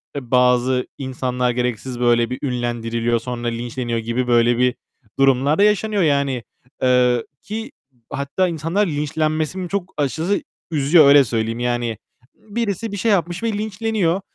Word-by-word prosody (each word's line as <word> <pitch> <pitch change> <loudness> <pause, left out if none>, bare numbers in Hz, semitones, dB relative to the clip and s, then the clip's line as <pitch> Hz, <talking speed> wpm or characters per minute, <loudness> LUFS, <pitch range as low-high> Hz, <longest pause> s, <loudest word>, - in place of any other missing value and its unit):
eee, 130 -4 -6
bazı 125 0 +3
insanlar 125 -2 -1
gereksiz 125 0 -3
böyle 120 -1 +3
bir 125 - -4
ünlendiriliyor, 120 -2 -1
sonra 120 0 -5
linçleniyor 120 0 -3
gibi 120 +3 -2
böyle 120 0 +3
bir 125 0 +2 0.4
durumlar 135 +2 +3
da - - +6
yaşanıyor 210 0 +2
yani. 140 -5 +1 0.4
Eee, 125 -2 +3 0.2
ki 220 +2 -6 0.4
hatta 140 +7 -1
insanlar 170 +5 0
linçlenmesini 155 +3 -2
çok 190 -1 -3
aşırı 160 +7 0 0.3
üzüyor 150 +1 +5
öyle 140 0 +8
söyleyeyim 115 -1 -2
yani. 120 -2 -1 0.4
Birisi 220 -1 -3
bir 205 - -4
şey 220 +3 +1
yapmış 175 0 0
ve 230 -1 0
linçleniyor. 210 -3 -1
135 Hz, 140 wpm, -20 LUFS, 120-175 Hz, 0.4 s, öyle